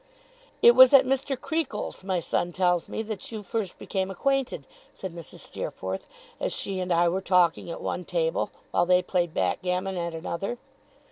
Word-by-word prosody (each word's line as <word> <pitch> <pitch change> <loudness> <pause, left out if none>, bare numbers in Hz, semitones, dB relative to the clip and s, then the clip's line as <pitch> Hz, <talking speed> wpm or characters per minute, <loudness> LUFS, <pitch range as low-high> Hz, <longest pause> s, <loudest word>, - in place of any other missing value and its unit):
'It 235 - +10
was 260 +2 +8
at 270 -1 +7
Mr. 270 0 0
Creakle's, 320 - -3
my 190 -2 0
son 175 +1 -1
tells 180 -1 +1
me, 220 - -3
that 215 -1 -6
you 215 -2 -5
first 205 -2 -3
became 190 -1 -2
acquainted,' 270 +7 -1 0.3
said 190 -3 -6
Mrs. 170 -2 -9
Steerforth, 95 +1 -5 0.3
as - - -1
she 195 -1 -3
and 180 0 -2
I 170 0 +4
were 185 +3 0
talking 180 -3 +2
at 170 - -6
one 180 - -3
table, - - 0 0.2
while 175 - +2
they 180 0 +4
played 175 -2 0
backgammon 180 - -1
at 170 -1 -3
another. 170 +8 -4
185 Hz, 175 wpm, -27 LUFS, 175-235 Hz, 0.3 s, It